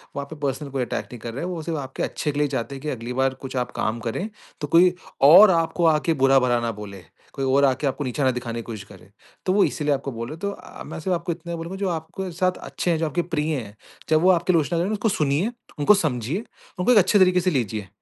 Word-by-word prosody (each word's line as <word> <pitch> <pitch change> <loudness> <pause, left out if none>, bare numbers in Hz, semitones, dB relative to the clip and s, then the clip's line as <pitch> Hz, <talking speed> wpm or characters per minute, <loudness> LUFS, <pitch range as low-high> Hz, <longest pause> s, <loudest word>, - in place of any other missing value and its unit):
वो 140 - -2
आप 140 - -9
पे 160 - -8
पर्सनल 140 +2 -4
कोई 135 -1 -2
अटैक - - -3
नहीं 125 - -8
कर 115 +1 -6
रहा 130 - -5
है, - - -2
वो 175 -3 -4
सिर्फ 165 0 -3
आपके 135 -1 -5
अच्छे 150 - -2
के 145 - -3
लिए 150 - +3
चाहते 135 0 -3
हैं 135 - -9
कि 150 - -4
अगली 125 -2 -4
बार 130 +1 +1
कुछ 130 0 -7
आप 125 - -1
काम 110 +2 -2
करें, 120 - -3 0.3
तो 150 - -2
कोई 175 +4 +5 0.3
और 175 +9 +9
आपको 165 0 +1
आके 165 +2 0
बुरा-भला 135 -3 +3
ना 115 - -1
बोले। 100 -3 -9 0.3
कोई 135 -2 -2
और 135 +2 +4
आके 135 +1 +1
आपको 140 +2 -2
नीचे 140 +2 -2
ना 130 - +4
दिखाने 120 -2 -4
की - - -6
कोशिश 110 -3 -7
करे। 95 -1 -15 0.4
तो 185 - +2
वो 200 0 +5
इसीलिए 150 -1 0
आपको 135 0 -3
बोल 115 0 -5
रहे - - -6
हैं - - -16
तो 200 +3 -2
अ, - - -11
मैं - - -7
सिर्फ 185 +4 -1
आपको 170 +1 -3
इतना 170 +1 -5
बोलूँगा 170 +3 -6
जो 195 -1 -1
आपके 170 +3 -4
साथ 185 +2 +1
अच्छे 175 - -3
हैं, 165 - +1
जो 165 - 0
आपके 170 +3 0
प्रिय 155 0 0
हैं, 110 -6 -6 0.3
जब 155 0 +4
वो 185 - +5
आपकी 175 +1 +2
आलोचना 165 +1 +1
करे 175 - 0
ना 215 - -1
उसको 215 +1 0
सुनिए, 155 +4 +1 0.3
उनको 145 +8 +6
समझिए, 155 - -1 0.4
उनको 180 +7 +3
एक 240 - +6
अच्छे 205 +1 +5
तरीके 185 -1 +5
से 185 +1 +1
लीजिए। 110 - -2
150 Hz, 275 wpm, -23 LUFS, 130-175 Hz, 0.4 s, और